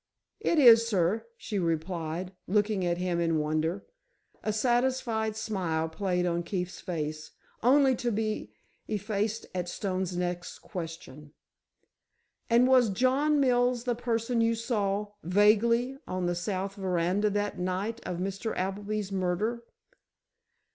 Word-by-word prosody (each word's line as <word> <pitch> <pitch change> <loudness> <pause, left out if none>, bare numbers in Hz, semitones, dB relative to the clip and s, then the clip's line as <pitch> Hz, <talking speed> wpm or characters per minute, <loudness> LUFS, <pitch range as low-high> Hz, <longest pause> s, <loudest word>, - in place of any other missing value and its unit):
"It 340 - +1
is, 230 -5 +8
sir," 200 0 +1
she 210 - -3
replied, 165 +1 -2
looking 205 0 +1
at 175 -1 0
him 180 -1 -1
in 165 -1 +1
wonder. 155 +5 -1 0.6
A 215 - -1
satisfied 240 -1 +1
smile 185 -8 -1
played 180 +1 -1
on 170 -1 0
Keefe's 180 +1 -4
face, 155 -3 -4 0.3
only 265 +2 +5
to 240 -1 -1
be 215 - -2 0.4
effaced 210 +1 -2
at 180 -1 -3
Stone's 185 -1 -2
next 180 0 -3
question. 160 -5 -8 1.2
"And 240 +2 +5
was 255 -3 +5
John 265 +8 +2
Mills 245 -2 +2
the 245 -1 0
person 235 0 -1
you 230 0 +2
saw—vaguely—on 210 - +1
the 175 - +1
south 190 +2 -3
veranda 190 +1 0
that 205 -1 -2
night 190 +6 -2
of 175 - -4
Mr. 195 +4 -3
Appleby's 200 +2 -2
murder?" 195 +5 -1
200 Hz, 120 wpm, -29 LUFS, 180-230 Hz, 1.2 s, is